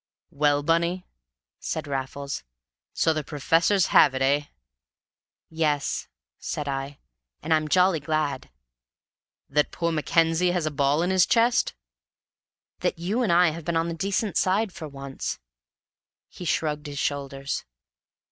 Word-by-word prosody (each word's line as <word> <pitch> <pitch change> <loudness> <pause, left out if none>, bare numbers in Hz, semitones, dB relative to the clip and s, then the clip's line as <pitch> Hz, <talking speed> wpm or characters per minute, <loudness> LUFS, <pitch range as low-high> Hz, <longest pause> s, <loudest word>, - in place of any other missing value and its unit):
"Well, 145 0 +2
Bunny," 170 +3 +1 0.5
said - - -3
Raffles, 140 - -4 0.5
"so 160 - +2
the 155 -1 -2
professors 165 +7 +2
have 135 -3 +6
it, 130 - 0
eh?" 145 +2 +2 1.0
"Yes," 155 -3 -1 0.3
said 150 -1 -4
I. 135 0 -4 0.5
"And 160 - +1
I'm 155 -1 +2
jolly 180 +1 +3
glad!" 150 - -2 1.0
"That 150 +1 +1
poor 170 -1 -1
Mackenzie 165 +2 +2
has 175 -3 0
a 155 - -1
ball 145 +2 +2
in 180 - 0
his 185 -2 +4
chest?" 230 - +2 1.0
"That - - -1
you 195 +9 -1
and 220 -7 +1
I 175 0 +5
have 165 +1 -7
been 165 +1 -1
on 165 +1 0
the - - -3
decent 195 +4 -1
side 195 +3 +2
for 155 - -7
once." 140 -1 -5 0.9
He 180 - -9
shrugged 150 -2 -1
his 145 0 -7
shoulders. 140 -1 -3
155 Hz, 140 wpm, -25 LUFS, 145-175 Hz, 1.0 s, have